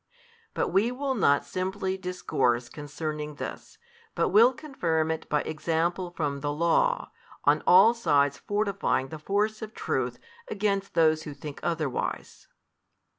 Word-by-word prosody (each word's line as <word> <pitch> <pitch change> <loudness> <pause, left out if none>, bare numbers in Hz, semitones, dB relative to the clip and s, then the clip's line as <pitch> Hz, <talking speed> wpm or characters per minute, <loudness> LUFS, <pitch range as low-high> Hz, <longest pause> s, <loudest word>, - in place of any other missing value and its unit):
But - - 0
we 215 +5 +2
will 270 +2 -2
not 145 - +3
simply 190 +1 -2
discourse 135 -10 -1
|356 - - -18
concerning 150 0 -5
this, - - -7 0.4
but - - +1
will 230 +5 +6
confirm 170 - -1
it 160 0 -5
by 150 -1 +2
example 170 +3 -1
from 145 -3 -1
the 145 +1 -2
Law, 170 - +1 0.3
on - - +4
all 195 +6 +7
sides 145 - +2
fortifying 200 -9 -1
the 160 - -7
force 210 +6 -1
of 220 0 -7
truth - - -2 0.3
against 200 - -1
those 155 -2 +4
who 150 -2 -8
think 145 0 -8
otherwise. 155 -6 -3
170 Hz, 140 wpm, -27 LUFS, 150-205 Hz, 0.4 s, all